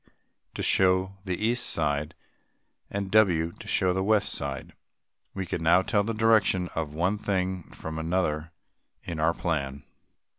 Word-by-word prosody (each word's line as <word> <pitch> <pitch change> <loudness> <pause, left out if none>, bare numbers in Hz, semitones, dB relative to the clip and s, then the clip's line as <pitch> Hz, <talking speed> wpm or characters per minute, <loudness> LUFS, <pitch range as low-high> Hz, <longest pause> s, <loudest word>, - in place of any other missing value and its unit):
to - - -3
show 95 +1 +2
the 90 -2 -1
east 120 +1 +1
side, 75 -2 -1 0.7
and 100 -1 -3
W. 90 -7 +4
to - - -13
show 90 -1 +2
the 95 - 0
west 105 0 +2
side. 70 -2 -5 0.6
We 95 -1 -3
can 85 - -3
now 85 +3 +5
tell 100 +1 +2
the 115 +2 -2
direction 110 -5 +3
of 75 -2 -3
one 90 +6 +1
thing 95 -3 -1
from 80 0 -6
another 80 -2 -1 0.5
in 85 -2 -5
our 80 +2 +2
plan. 70 -5 -2
90 Hz, 150 wpm, -27 LUFS, 80-95 Hz, 0.7 s, now